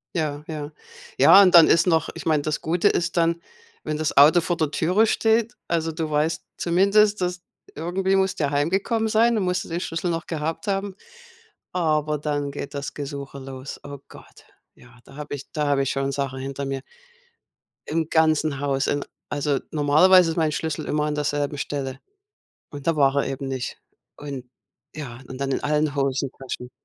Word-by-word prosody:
Ja, 150 -3 -2
ja. 150 -1 -5 0.5
Ja, 200 - +8
und 185 -2 +4
dann 170 -2 +9
ist 165 - +4
noch 160 -3 +2
ich - - -8
meine, 155 -3 +2
das 155 0 -2
Gute 175 +5 +2
ist 175 -2 -1
dann, 170 0 +2 0.4
wenn 155 - -2
das 155 0 -2
Auto 150 +5 +7
vor 175 +1 -1
der 155 -3 0
Türe 180 +8 +2
steht 225 +1 +1
also 165 -1 0
du 160 -1 -3
weißt 150 +2 0
zumindest, 200 +4 +3
dass 180 -1 -2 0.3
irgendwie 185 +5 0
musst 190 -2 0
du 150 - +2
ja 140 - 0
heimgekommen 190 +10 0
sein 225 +2 +3
und 200 - 0
musst 180 0 -1
du - - -12
den 170 +1 -3
Schlüssel 170 0 -2
noch 165 0 -3
gehabt 160 +4 -4
haben, 195 -1 -2 0.8
aber 155 -4 0
dann 145 -1 -2
geht 140 0 -7
das 140 -1 -4
Gesuche 140 -1 -6
los. 135 0 -8
Oh 145 0 -8
Gott, - - -16 0.3
ja, 125 0 -19
da 135 - -15
habe 150 -1 -6
ich 140 - -9
da 150 -1 -1
habe 140 -1 +2
ich 135 - -1
schon 135 0 -1
Sachen 135 -1 -3
hinter 135 +1 -5
mir, 135 -1 -3 1.0
im 160 0 -1
ganzen 155 -3 +2
Haus. 140 -1 0
In 145 - 0 0.3
also 145 -1 0
normalerweise 165 +4 +5
ist 160 - -4
mein 160 -2 +1
Schlüssel 155 0 -3
immer 150 0 0
an 150 - -1
derselben 145 0 -1
Stelle 135 -2 -4 0.7
und 145 -2 -9
da 165 - +3
war 140 -1 +3
er 140 - +1
eben 135 0 -4
nicht. 130 -2 -4 0.4
Und 140 -3 -7 0.5
ja 130 -6 -7
und 130 - -8
dann 135 0 -1
in - - -2
allen 150 0 +1
Hosentaschen 135 -2 -3
150 Hz, 190 wpm, -23 LUFS, 140-170 Hz, 1.0 s, dann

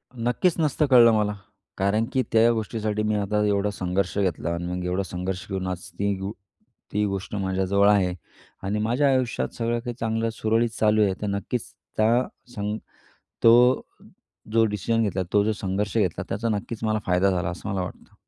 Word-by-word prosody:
नक्कीच 120 +9 +1
नसतं 150 -1 +2
कळलं 120 -2 +8
मला. 105 -1 +1 0.4
कारण 100 +3 +1
की 130 - +3
त्या 115 +1 +5
गोष्टीसाठी 110 -1 -2
मी 105 0 +1
आता 105 +1 0
एवढा 100 0 +1
संघर्ष 90 -1 -2
घेतला 85 -4 0
आणि 85 +1 -4
मग 90 0 -3
एवढा 90 +2 0
संघर्ष 90 0 -4
घेऊन 95 -1 -3
आज 90 -1 -3 0.2
ती, 100 0 +1
गो 95 +1 -4 0.6
ती 105 +1 +2
गोष्ट 100 +1 -4
माझ्याजवळ 95 +1 +2
आहे 95 -3 +3 0.5
आणि 100 +2 -1
माझ्या 120 +7 +2
आयुष्यात 130 -3 0
सगळं 120 0 -1
काही 120 0 -5
चांगलं 115 0 0
सुरळीत 115 +1 +1
चालू 110 0 +4
आहे. 100 -2 +2
तर 105 - -2
नक्कीच 100 +3 -3 0.3
त्या 115 +4 +3 0.3
सं 105 -1 -2 0.7
तो 120 +2 +6 0.7
जो 115 0 +5
डिसिजन 110 +2 0
घेतला 95 -3 0
तो 105 0 +4
जो 110 - +1
संघर्ष 100 +1 -2
घेतला 95 -6 0
त्याचा 115 +2 -2
नक्कीच 110 +2 -6
मला 110 0 +1
फायदा 90 +2 +3
झाला 90 -2 -1
असं 90 - -7
मला 100 -1 -1
वाटतं. 90 - -9
105 Hz, 175 wpm, -25 LUFS, 95-115 Hz, 0.7 s, कळलं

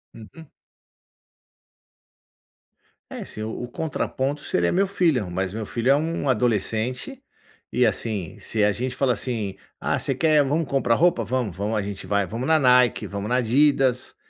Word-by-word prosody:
Uhum. 130 +8 -13 2.6
É, - - -6
assim, 110 - -7
o 110 +2 -5
o - - -4
contraponto 140 0 -3
seria 85 -8 0
meu 195 +2 +2
filho, 160 - +1
mas 95 +2 -2
meu 110 -1 -4
filho 120 +5 0
é 140 - +6
um 155 -2 -1
adolescente, 125 - -1 0.5
e 125 0 +3
assim, 105 -4 -2
se 110 -2 -1
a 105 - +4
gente 130 +3 -3
fala 130 -2 +2
assim: 110 -4 -3 0.2
"Ah - - -1
você 135 - -1
quer 155 +1 +4
vamo 150 +4 0
comprar 135 -4 +1
roupa?" 165 -7 +3
"Vamo, 125 -4 -1
vamo". 100 +5 -3
A 105 - +1
gente 100 0 -6
vai, 100 -1 +1
vamos 115 +7 -4
na 160 -1 +4
Nike, 125 -3 +4
vamos 100 +2 -5
na 125 - +2
Adidas. 130 +1 +2
125 Hz, 165 wpm, -24 LUFS, 110-140 Hz, 2.6 s, é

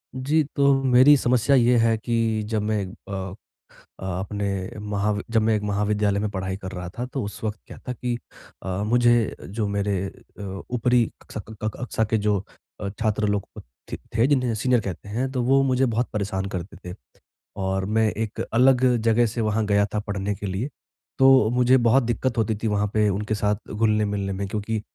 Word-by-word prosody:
जी, 145 +5 +2
तो 140 0 +4
मेरी 130 +3 +7
समस्या 125 +2 +3
ये 120 -1 +4
है 115 -1 +3
कि 115 -1 0
जब 110 -2 0
मैं 105 -1 0
अ 95 0 -7 0.7
अ, - - -9 0.2
अपने 100 0 -3
महावि 105 0 -1
जब 115 -1 +3
मैं 110 0 +2
एक 105 - -1
महाविद्यालय 105 0 +1
में 105 +1 -1
पढ़ाई 95 -1 -3
कर 95 -2 -7
रहा 90 -2 -6
था 120 - -2
तो 135 - -2
उस 100 0 -6
वक्त 110 -1 -3
क्या - - -10
था 125 - -2
कि 120 0 -3 0.5
अ, 95 +1 -2
मुझे 120 +1 +3
जो 105 +2 -2
मेरे 100 0 -1 0.4
अ, 95 -1 -6
ऊपरी 125 0 +3 0.2
कक्षा - - -8
क 110 - -9
क 110 - +1
कक्षा 125 -2 -1
के 110 - +2
जो 105 -1 +1 0.4
अ, 100 - -2
छात्र 110 -2 +1
लोग 100 -1 0
क - - -7 0.3
थे - - -3 0.2
थे 115 - +5
जिन्हें 125 -5 +2
सीनियर 125 +2 +2
कहते 100 0 -6
हैं 125 +5 -2
तो 130 -2 -1
वो 135 +2 +4
मुझे 130 0 +2
बहुत 120 0 0
परेशान 100 -2 -2
करते 90 +1 -6
थे। - - -8 0.7
और 95 0 -1
मैं 110 +2 +2
एक 110 -1 -4
अलग 130 +2 +5 0.2
जगह 115 +1 +3
से 115 +2 -3
वहाँ 110 0 0
गया 100 0 +3
था 105 - +1
पढ़ने 100 0 -2
के 100 - -7
लिए, 100 +8 -2 0.5
तो 135 -4 +6
मुझे 125 +1 +4
बहुत 125 +2 +4
दिक्क़त 120 +1 -1
होती 110 -1 +1
थी, - - +2
वहाँ 105 -1 +1
पे 105 -1 +3
उनके 105 +2 -1
साथ 105 +1 -2
घुलने-मिलने 105 -2 0
में 100 +1 -3
क्योंकि 105 +2 -3
110 Hz, 195 wpm, -24 LUFS, 100-120 Hz, 0.7 s, मेरी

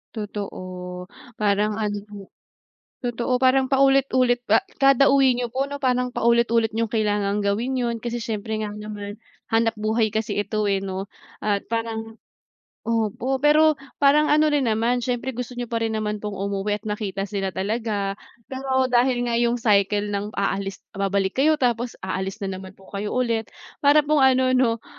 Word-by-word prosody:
Totoo, 205 -3 -5 0.7
parang 210 0 +1
ano 210 -1 -2 1.0
totoo 245 +1 -1
parang 260 +1 +4
paulit-ulit 265 -3 +3
pa 220 +2 +5 0.2
kada-uwi 275 -1 +5
nyo 245 -1 -2
po 265 +2 0
no 285 - -5
parang 250 -1 +1
paulit-ulit 235 -1 +2
yung 230 0 +1
kailangang 205 -2 +1
gawin 220 +6 0
'yon 240 -2 -1
kasi 240 +1 -4
siyempre 220 -1 -3
nga 210 - -3
naman 210 0 -7 0.3
hanapbuhay 225 -1 +1
kasi 220 -1 -2
ito, 215 0 -1
eh, 195 - +2
no? 195 0 -5 0.3
At 205 -1 0
parang 225 0 -4 0.6
opo, 230 +4 -1
pero 300 0 +4 0.2
parang 290 +2 +4
ano 305 0 +4
rin 275 -4 +2
naman 230 +3 +1
siyempre 250 +2 -2
gusto 250 0 -6
niyo 245 -1 -5
pa 230 - 0
rin 225 -1 -1
naman 210 -1 -2
pong 210 -1 -5
umuwi 200 +1 -1
at 210 - -15
nakita 205 -2 -3
sila 195 -1 -3
talaga 205 +1 -2 0.3
pero 260 0 -1
dahil 245 0 +2
nga 235 -1 0
yung 240 0 +2
cycle 205 -2 +2
ng 205 +1 -4
aalis 195 -1 -2
babalik 195 0 0
kayo 310 +2 +4
tapos 240 -3 -1
aalis 190 +2 -3
na 190 - -3
naman 190 0 -11
po 195 - -19
kayo 200 +1 -3
ulit, 230 -3 0 0.3
para 295 +1 +5
pong 300 0 +2
ano 260 -1 +4
'no, 230 -3 +1
225 Hz, 160 wpm, -23 LUFS, 205-250 Hz, 1.0 s, pa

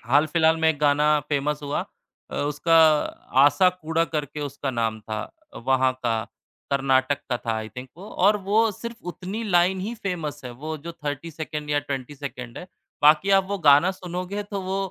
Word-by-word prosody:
हाल-फिलहाल 155 +5 +3
में 160 - +4
एक 160 -2 0
गाना 150 +1 +3 0.2
फ़ेमस 150 0 0
हुआ 145 0 -1 0.5
अ, - - -7
उसका 145 +3 +1 0.7
"आसा 145 +6 +5
कूड़ा" 160 +1 +1
करके 150 -2 -4
उसका 140 -1 -3
नाम 115 -3 -1
था। 110 0 -4 0.3
अ, - - -7
वहाँ 130 +1 +2
का 115 -2 0 0.5
कर्नाटक 135 0 +2
का 125 - +2
था 115 -1 -3
आई 110 0 -5
थिंक 125 +4 -9
वो 195 +4 -10 0.2
और 210 +1 +5
वो 220 +3 +3
सिर्फ 235 +3 -8
उतनी 190 +5 -6
लाइन 185 -1 +3
ही 215 +5 -4
फ़ेमस 175 - -4
है। 125 - -5
वो 155 +6 -6
जो 170 - -5
30 150 0 -5
सेकंड 150 -1 -5
या 145 - +2
20 140 -1 -5
सेकंड 125 -4 -7
है। 180 - -9 0.4
बाकी 155 +6 +5
आप 195 - +3
वो 200 - -1
गाना 150 +2 +6
सुनोगे 185 +2 -5
तो 200 -1 -5
वो 190 +1 -2
150 Hz, 185 wpm, -24 LUFS, 135-180 Hz, 0.7 s, गाना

